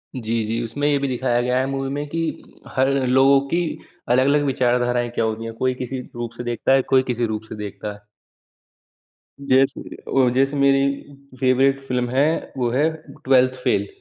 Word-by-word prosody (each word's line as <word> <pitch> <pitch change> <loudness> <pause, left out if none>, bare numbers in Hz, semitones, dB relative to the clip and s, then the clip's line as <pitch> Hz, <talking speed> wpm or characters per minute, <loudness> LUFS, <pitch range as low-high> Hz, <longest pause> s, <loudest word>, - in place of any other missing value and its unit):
जी, 115 -2 -2
जी। 115 +2 -2
उसमें 145 +6 -2
ये 145 -1 +3
भी 140 - -1
दिखाया 125 -1 0
गया 125 +1 0
है 130 - +1
मूवी 135 0 -3
में 145 +1 -3
कि 165 - -3 0.6
हर 130 +1 +3 0.2
लोगों 135 +2 +5
की 170 +5 0 0.5
अलग-अलग 140 +4 +3
विचारधाराएँ 120 -2 +1
क्या 115 - +1
होती 110 +1 -3
हैं, 115 - -6
कोई 130 +2 0
किसी 130 +1 -5
रूप 120 -1 -4
से 120 - -5
देखता 120 +2 0
है, 135 - +4
कोई 130 0 +2
किसी 120 -1 0
रूप 110 0 -3
से - - -6
देखता 105 0 -6
है। 105 0 -18 1.4
जैसे 135 -1 +1 0.2
ओ 125 -2 +5
जैसे 135 +2 +2
मेरी 140 0 +4 0.6
फेवरेट 135 +1 +3
फिल्म 125 -1 -1
है 135 +3 +2 0.3
वो 120 -2 0
है, 145 +5 +2 0.4
ट्वेल्थ 130 -1 +4
फेल। - - +1
130 Hz, 180 wpm, -21 LUFS, 120-135 Hz, 1.4 s, लोगों